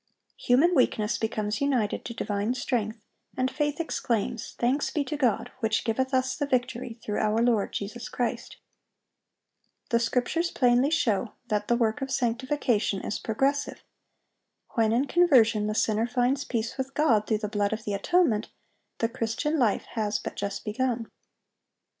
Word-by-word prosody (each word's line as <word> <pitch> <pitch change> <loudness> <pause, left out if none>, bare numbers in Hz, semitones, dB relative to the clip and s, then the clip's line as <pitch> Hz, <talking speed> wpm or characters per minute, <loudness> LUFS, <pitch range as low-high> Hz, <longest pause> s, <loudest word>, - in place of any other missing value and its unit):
Human 285 +9 +3
weakness 220 -7 +2
becomes 215 0 -2
united 255 -7 0
to 235 - -6
divine 205 +4 -1
strength, 220 -4 -2 0.3
and 260 0 +1
faith 295 +2 -1
exclaims, 235 -8 -2
"Thanks 260 +5 +1
be 295 - -1
to 300 - -4
God, 255 -7 0
which 220 -2 0
giveth 260 +3 0
us 260 0 +1
the 290 - -2
victory 245 -2 -1
through 210 - -2
our 215 +1 +1
Lord 230 -3 +2
Jesus 225 +4 -5
Christ."(800) 245 -1 -9
The 235 - +4
Scriptures 250 +9 0
plainly 250 0 +3
show 235 -8 +1 0.2
that 210 -1 0
the 240 - +3
work 230 +2 0
of 270 - -3
sanctification 240 -5 0
is - - -2
progressive. 275 +6 -1 0.9
When 225 -3 +2
in 245 +5 +2
conversion 240 -11 +4
the 215 - -2
sinner 220 +1 +1
finds 250 +3 +1
peace 230 +2 -3
with 265 +1 -3
God 230 -9 +3
through 220 - +2
the 210 0 -3
blood 205 -1 0
of 220 0 -3
the 205 - -3
atonement, 225 - +2 0.5
the 230 - +1
Christian 245 +6 -1
life 225 -6 +2
has 210 -2 -1
but - - -6
just 200 0 -4
begun. 230 +1 -2
235 Hz, 155 wpm, -27 LUFS, 215-265 Hz, 0.9 s, The